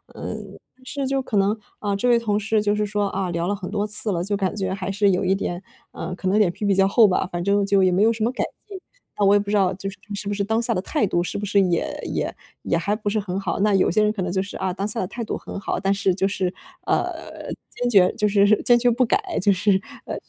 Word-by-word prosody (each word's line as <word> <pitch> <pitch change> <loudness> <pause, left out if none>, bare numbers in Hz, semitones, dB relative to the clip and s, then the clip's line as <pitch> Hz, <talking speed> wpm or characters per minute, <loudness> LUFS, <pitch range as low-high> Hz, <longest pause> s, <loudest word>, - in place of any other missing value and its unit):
嗯， - - -7 0.3
是 275 +1 -4
就 270 0 0
可 225 -5 -2
能， 200 +2 +3 0.2
啊， 205 -1 -2
这 245 +5 +1
位 240 - +6
同 210 -3 0
事 220 +1 +1
就 205 0 +2
是 210 0 0
说 205 0 0
啊 190 -1 -2
聊 170 0 -2
了 205 - 0
很 190 -2 -7
多 205 0 -1
次 210 0 -2
了， 175 -1 -1
就 205 +2 -1
感 195 0 -1
觉 190 -2 -2
还 190 0 -3
是 200 0 +3
有 180 - 0
一 190 +1 +2
点， 175 -2 -3 0.3
呃， 180 +2 -5
可 185 - -5
能 200 +3 +3
脸 200 -5 +4
皮 205 - -5
比 200 - +3
较 195 0 +4
厚 220 +2 +6
吧。 185 -1 0
反 175 0 -3
正 200 +1 +2
就 195 -1 +3
也 185 - +4
没 180 +2 +2
有 225 - +5
什 220 -1 -3
么 235 - +2
改 - - -2 0.2
进， 390 -2 -8 0.4
那 205 - +2
我 200 - +6
也 - - +5
不 200 0 -5
知 210 - +1
道 195 -2 +3
就 195 +1 -5
是 195 - -11 0.2
是 200 0 -5
不 205 - -1
是 200 - -1
当 220 +3 0
下 235 0 0
的 180 - 0
态 295 -5 0
度 175 -1 0
是 180 - -4
不 205 - -3
是 200 +1 +3
也 175 -3 +1 0.2
也 - - -2 0.3
也 170 - +1
还 200 +5 0
不 210 -1 -3
是 215 +1 0
很 195 -2 -3
好， 195 -3 -2
那 210 0 +3
有 190 - +3
些 210 +4 +3
人 210 - +3
可 210 - -4
能 180 -1 -2
就 190 - 0
是 200 - -9
啊， 190 -1 -1
当 200 +2 -3
下 225 +2 -2
的 185 - -1
态 235 +5 -5
度 225 - -3
很 - - -7
好。 - - -2
但 195 +1 0
是 195 -1 +1
就 190 +1 +1
是， 190 -2 -1 0.3
呃， - - -3 0.2
坚 245 - -2
决 190 -5 +5
就 210 -2 +1
是 205 +1 +4
坚 240 - +6
决 240 0 +3
不 245 +2 +2
改， 355 +9 0
就 205 - +4
是， 190 0 +2 0.2
呃 - - -4
200 Hz, 315 characters per minute, -23 LUFS, 190-215 Hz, 0.4 s, 位